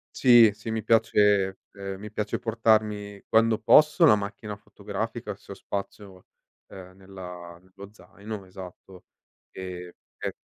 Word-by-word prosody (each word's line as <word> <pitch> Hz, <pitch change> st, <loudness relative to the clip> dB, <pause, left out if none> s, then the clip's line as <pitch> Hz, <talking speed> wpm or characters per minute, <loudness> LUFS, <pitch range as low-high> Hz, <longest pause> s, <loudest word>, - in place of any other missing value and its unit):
Sì, 120 Hz, -4 st, +7 dB
sì, 110 Hz, +2 st, -9 dB
mi 110 Hz, -1 st, -3 dB
piace 105 Hz, -4 st, +3 dB
ehm, 95 Hz, -1 st, -7 dB
mi 105 Hz, +1 st, -9 dB
piace 105 Hz, 0 st, -3 dB
portarmi, 105 Hz, -3 st, 0 dB
quando 110 Hz, 0 st, +3 dB
posso, 150 Hz, -, +5 dB
la 125 Hz, -, +7 dB
macchina 105 Hz, +1 st, -6 dB
fotografica -, -, -6 dB
se -, -, -12 dB
ho -, -, -13 dB
spazio, 100 Hz, -1 st, -7 dB, 0.4 s
uhm, 90 Hz, -1 st, -12 dB
nella 90 Hz, -3 st, -10 dB
nello 95 Hz, +2 st, -14 dB
zaino, 105 Hz, -1 st, -10 dB
esatto. 95 Hz, 0 st, -12 dB, 0.5 s
Ehm, 90 Hz, -1 st, -7 dB, 0.3 s
e -, -, -3 dB
100 Hz, 130 wpm, -26 LUFS, 95-110 Hz, 0.5 s, Sì